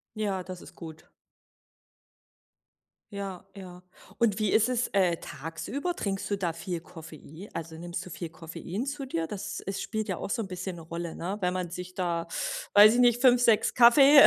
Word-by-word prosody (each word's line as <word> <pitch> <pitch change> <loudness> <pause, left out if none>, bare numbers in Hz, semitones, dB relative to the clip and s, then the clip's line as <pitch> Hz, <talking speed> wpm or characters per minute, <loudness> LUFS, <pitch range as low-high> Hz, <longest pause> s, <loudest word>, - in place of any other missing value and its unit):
Ja, 200 -4 -1
das 185 -1 -8
ist - - -13
gut. 160 -2 -11 2.0
Ja, 195 -2 -5
ja. 180 -2 -10 0.4
Und 220 -3 +2
wie 215 -2 +1
ist 220 +2 +4
es, 250 -1 0
äh, 185 -4 +2
tagsüber? 220 - -5
Trinkst 195 - -3
du 200 - +1
da 180 -4 -1
viel 170 +1 -4
Koffei 160 +2 -11
also 160 0 -5
nimmst 175 +1 -5
du 185 - -10
viel 170 +1 -5
Koffein 165 +6 -6
zu 280 0 -4
dir? 165 -10 -2
Dass 205 +1 -5
es 195 0 -4
spielt 220 -2 -3
ja 185 - -2
auch - - -5
so 225 +2 -1
'n 195 - -6
bisschen 180 0 -5
'ne 165 - -9
Rolle, 170 +1 -5
ne? 190 +5 -3
Wenn 180 -1 0
man 180 -2 -3
sich 180 +1 -7
da, 170 -2 -1 0.5
weiß 210 +2 +9
ich 245 - +3
nicht, 240 0 +4
5, 250 -2 +6
6 225 -3 +4
Kaffee, 275 +4 +9
190 Hz, 190 wpm, -28 LUFS, 170-220 Hz, 2.0 s, weiß